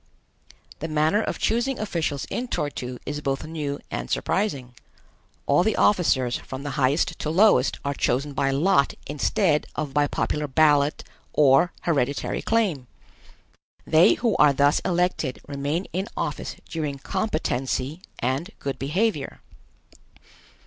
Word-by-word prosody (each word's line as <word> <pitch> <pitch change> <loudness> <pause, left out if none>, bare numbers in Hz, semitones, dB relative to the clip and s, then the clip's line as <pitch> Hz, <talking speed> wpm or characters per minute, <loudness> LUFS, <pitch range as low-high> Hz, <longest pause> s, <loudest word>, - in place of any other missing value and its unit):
The 160 - -3
manner 155 +6 +2
of - - -3
choosing 240 +4 0
officials 165 -9 -2
in 250 - -2
Tor 150 -10 -2
tu 125 -2 -6
is 145 0 -4
both 135 -2 -2
new 150 -3 -4
and - - -4
surprising. 140 -12 -1 0.7
All 145 +4 +4
the 215 +3 +1
officers, 130 -11 +2
from 135 +1 -8
the 145 - -4
highest 140 +5 +1
to 150 - -2
lowest, 170 -6 +4
are 140 - 0
chosen 140 +2 0
by 135 0 +1
lot 140 +2 +2
instead 150 +2 +1
of 150 -3 -3
by 145 0 +3
popular 150 +1 -2
ballot 145 0 +3 0.3
or 145 +4 +5
hereditary 140 -4 -1
claim. 195 - 0 1.0
They 160 +3 +5
who 235 -2 0
are 145 - +6
thus 145 +1 +3
elected 180 -7 -1
remain 145 +6 -2
in 190 +4 -2
office - - -3
during 150 -4 -3
competency 155 - -2 0.2
and 130 - -1
good 140 -1 -4
behavior. 155 +1 -1
150 Hz, 135 wpm, -24 LUFS, 140-180 Hz, 1.0 s, are